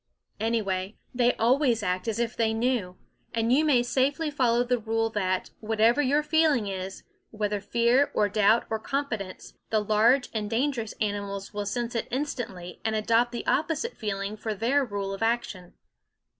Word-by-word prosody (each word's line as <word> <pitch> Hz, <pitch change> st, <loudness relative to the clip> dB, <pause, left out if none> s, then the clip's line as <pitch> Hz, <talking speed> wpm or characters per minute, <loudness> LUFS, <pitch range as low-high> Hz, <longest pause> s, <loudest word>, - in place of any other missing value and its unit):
Anyway, 205 Hz, -3 st, -1 dB, 0.2 s
they 245 Hz, 0 st, +2 dB
always 240 Hz, -1 st, +2 dB
act 185 Hz, 0 st, -1 dB
as 225 Hz, -, -1 dB
if 235 Hz, 0 st, -1 dB
they 220 Hz, -1 st, +1 dB
knew; 225 Hz, -6 st, -1 dB, 0.4 s
and 230 Hz, +1 st, +2 dB
you 295 Hz, +4 st, +4 dB
may 270 Hz, -6 st, +4 dB
safely 280 Hz, +5 st, 0 dB
follow 245 Hz, -4 st, +2 dB
the 245 Hz, 0 st, 0 dB
rule 225 Hz, 0 st, -1 dB
that, 185 Hz, -3 st, -1 dB
whatever 225 Hz, +4 st, +3 dB
your 290 Hz, +2 st, +2 dB
feeling 300 Hz, -6 st, +3 dB
is, 190 Hz, -1 st, -5 dB, 0.3 s
whether 210 Hz, -2 st, -2 dB
fear 235 Hz, +6 st, +3 dB
or 210 Hz, -, +3 dB
doubt 215 Hz, +2 st, +3 dB
or 220 Hz, -, 0 dB
confidence, 220 Hz, -7 st, -4 dB, 0.2 s
the 220 Hz, -, +2 dB
large 220 Hz, +5 st, +3 dB
and 210 Hz, -2 st, -2 dB
dangerous 235 Hz, -2 st, -1 dB
animals 200 Hz, -2 st, -3 dB
will 205 Hz, -1 st, -3 dB
sense 235 Hz, +3 st, -2 dB
it 230 Hz, -, -2 dB
instantly 235 Hz, -10 st, -4 dB
and 220 Hz, 0 st, 0 dB
adopt 230 Hz, +3 st, +2 dB
the 240 Hz, -, -5 dB
opposite 325 Hz, +9 st, 0 dB
feeling 200 Hz, -1 st, -3 dB
for 215 Hz, 0 st, -4 dB
their 255 Hz, +7 st, +2 dB
rule 200 Hz, -4 st, -3 dB
of 195 Hz, -, -7 dB
action. 225 Hz, -6 st, -2 dB
225 Hz, 165 wpm, -27 LUFS, 205-250 Hz, 0.4 s, you